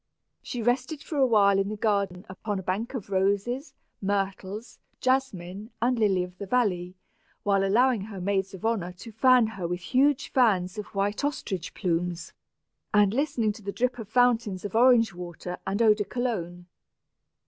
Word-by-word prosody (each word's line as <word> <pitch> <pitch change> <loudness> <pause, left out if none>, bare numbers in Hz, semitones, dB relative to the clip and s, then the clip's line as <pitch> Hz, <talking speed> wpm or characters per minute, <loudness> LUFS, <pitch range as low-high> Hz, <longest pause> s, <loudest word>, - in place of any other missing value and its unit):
She 245 -3 -5
rested 255 +5 0
for 310 - -5
a 265 - +5
while 200 -4 +4
in 195 0 0
the 215 - -3
garden 200 -4 0
upon 200 +2 -4
a 190 - -5
bank 215 +9 -2
of 205 -5 -6
roses, 200 +9 0 0.3
myrtles, 195 +2 -3 0.2
jasmine, 215 -7 -1
and 240 +1 +1
lilies 190 -4 +2
of 180 - -24
the 200 - -5
valley, 185 -6 0 0.5
while 195 -1 +2
allowing 235 +3 +3
her 205 -3 -8
maids 195 +1 -1
of 190 - -8
honor 195 -6 -1
to 200 +6 -11
fan 250 +2 +5
her 195 -5 -4
with 175 +1 -3
huge 275 +7 +2
fans 200 -7 +2
of 210 - -5
white 205 +5 0
ostrich 195 - -3
plumes, 175 -2 -2 0.6
and 205 -1 +4
listening 245 -5 +1
to 215 - -11
the 200 0 -4
drip 250 +3 -1
of 215 -3 -7
fountains 230 -5 +2
of 200 - -5
orange 235 -2 +5
flower 175 0 -10
water, 180 +1 -7
and 200 +4 +1
eau 215 -2 +7
de 210 0 -2
cologne. 180 -9 -3
205 Hz, 175 wpm, -27 LUFS, 190-240 Hz, 0.6 s, eau